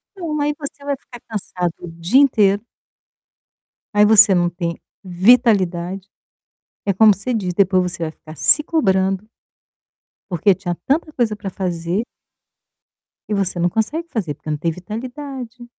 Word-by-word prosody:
Então 325 -5 -4
aí 295 +1 +1
você 285 -1 -8
vai 285 -1 -1
ficar 240 -2 -14
cansado 180 -5 -3
o 175 - -8
dia 170 +11 +2
inteiro 210 -7 +3 1.3
aí 210 0 +5
você 210 -2 +7
não 175 -1 +2
tem 170 -1 -4 0.3
vitalidade. 190 -2 +2 0.8
É 200 - +1
como 215 +2 +6
você 200 +6 -4
diz, 185 -6 -2
depois 185 -1 +2
você 170 -1 -5
vai 155 - -3
ficar 155 0 -14
se 300 - +5
cobrando 195 - 0 1.0
porque 185 +3 +3
tinha 180 -2 -4
tanta 310 +3 0
coisa 230 -6 0
para 200 -2 -6
fazer 180 +2 -2 1.3
e 210 - -1
você 195 -2 -1
não 175 +1 +2
consegue 295 - -2
fazer 185 - -3
porque 155 - -9
não 150 - 0
tem 165 +3 -1
vitalidade 245 - -7
200 Hz, 150 wpm, -19 LUFS, 175-245 Hz, 1.3 s, você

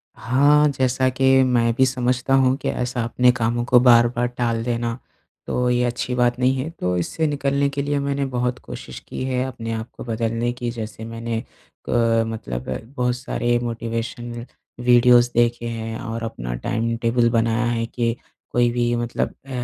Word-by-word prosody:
हाँ, 145 +5 +4
जैसा 130 -1 +1
कि 130 +1 -1 0.2
मैं 120 -2 +2
भी 130 - +4
समझता 125 0 0
हूँ 130 -1 +3
कि - - -3
ऐसा 125 -1 -2
अपने 125 +2 +3
कामों 120 0 0
को 125 0 +5
बार-बार 120 0 +4
टाल 120 -2 -1
देना, 115 -1 -2 0.5
तो 125 0 0
ये 125 0 +2
अच्छी 125 +1 -2
बात 120 -1 +2
नहीं 130 +1 +3
है, 130 +5 -3
तो 90 - -2
इससे 155 - -1
निकलने 140 -1 0
के 140 0 -3
लिए 145 0 -1
मैंने 140 0 -1
बहुत 125 -1 -2
कोशिश - - -8
की - - -5
है 130 -1 0
अपने 115 -3 -5
आप 110 +1 -5
को - - -6
बदलने 115 +1 -1
की 120 -1 -4
जैसे 110 -1 -7
मैंने 115 0 -4 0.5
अ, 115 -1 +3
मतलब 65 - -5 0.3
बहुत 125 0 +1
सारे 120 -1 0
मोटिवेशन 115 0 -4 0.3
वीडियोस 120 0 +5
देखे 120 0 +2
हैं, 115 0 -4
और 115 -2 -5
अपना - - -5
टाइम 115 - -2
टेबल 115 0 +2
बनाया 115 0 +1
है 115 -1 -1
कि 115 0 -1 0.4
कोई 120 0 +3
भी 120 0 0
मतलब 120 0 -2
अ, - - -15
120 Hz, 175 wpm, -22 LUFS, 115-125 Hz, 0.5 s, को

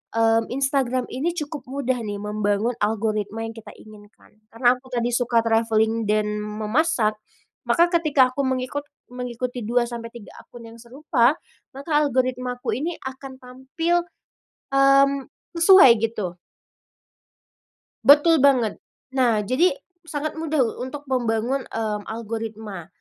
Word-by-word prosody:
mmm, 225 0 +3
Instagram 265 -2 0
ini 305 +7 -1
cukup 295 -4 -5
mudah 260 -1 -1
nih 205 -1 -5
membangun 210 +2 -1
algoritma 215 0 -1
yang 225 - -9
kita 225 - -11
inginkan, 210 0 -17 0.2
karena 245 +1 +3
aku 260 +1 -19
tadi 240 -1 -1
suka 240 -1 +2
travelling 225 0 +1
dan 210 0 0
memasak, 215 +2 0 0.5
maka 345 0 +4
ketika 295 -6 +4
aku 280 - -1
mengikut 260 +2 -2 0.3
mengikuti 250 -1 -5
2-3 235 -1 -3
akun 235 -1 -13
yang 230 +1 -13
serupa, 255 +1 +1 0.4
maka 280 +4 -9
algoritmaku 250 -2 -1
ini 325 +6 -4
akan 265 0 -8
tampil, 265 +8 -2 0.7
mmm, 275 0 +4 0.3
sesuai, 370 -7 +8
gitu. 210 -6 -3 1.7
Betul 295 +4 +6
banget. 260 -5 +3 0.4
Nah, 235 -5 +2
jadi, 270 - +2 0.3
sangat 305 +1 -4
mudah 310 -4 0 0.2
untuk 280 +3 -6
membangun, 245 +1 -1
mmm, 215 -2 -3
algoritma. 220 -5 -6
245 Hz, 115 wpm, -23 LUFS, 225-275 Hz, 1.7 s, sesuai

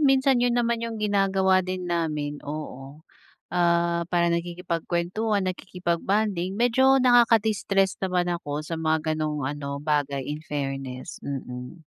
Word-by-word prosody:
minsan 270 -3 +4
yun 245 0 +2
naman 235 -1 +1
yung 230 -1 -4
ginagawa 195 -2 +2
din 185 0 -4
namin 155 -4 -2
oo, 145 0 -7 0.5
ah, 170 -1 +2
parang 170 -1 +2
nakikipagkwentuhan, 175 +4 -1
nakikipag-bonding, 185 +1 -1
medyo 260 +3 +4
nakaka-distress 220 -6 +3
naman 180 -2 0
ako 150 -3 -4
sa 165 +1 -4
mga 160 0 +1
ganong 150 -2 -2
ano 140 0 -4
bagay 145 -3 0
in 150 +1 -4
fairness, 135 -4 -5
mm. 130 +3 -7
175 Hz, 120 wpm, -25 LUFS, 150-200 Hz, 0.5 s, minsan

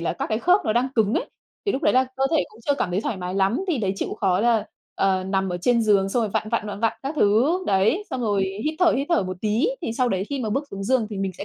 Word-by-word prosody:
là 170 - -1
các 170 - -4
cái 215 - -1
khớp 360 - +4
nó 215 - +1
đang 245 +3 +1
cứng 220 -2 +2
ấy. - - -2 0.4
Thì 400 - +2
lúc 275 - -3
đấy - - +3
là 255 +1 +4
cơ 270 - +1
thể 320 -3 +2
cũng - - -18
chưa 285 - +3
cảm 200 - -2
thấy 180 +3 0
thoải 220 - -3
mái 180 0 -5
lắm, 195 - +1
thì 315 -8 +1
đấy 195 -3 0
chịu - - -3
khó 190 -2 +2
là, 230 -1 +2 0.3
ờ, 190 -1 +1
nằm 190 0 0
ở 175 - -2
trên 235 +4 +2
giường, 200 -3 +3
xong 240 +5 0
rồi 220 - -1
vặn, 215 - -2
vặn, 225 -1 -1
vặn, 205 -1 -6
vặn 225 -1 +2
các 275 +3 -3
thứ, 245 - +3
đấy, 205 - +2
xong 255 - -3
rồi 205 -4 +1 0.2
hít 310 +1 -1
thở, 355 -2 +4
hít 275 +2 -1
thở 335 - +3
một 185 0 -5
tí 220 - +1
thì 230 - -2
sau 250 +2 +1
đấy 190 -3 -1
khi 280 -2 -3
mà 220 -3 -2
bước 275 +7 -1
xuống 195 0 -5
giường 245 0 +2
thì 210 - -5
mình 195 -1 -2
sẽ - - -5
220 Hz, 310 wpm, -23 LUFS, 195-260 Hz, 0.4 s, khớp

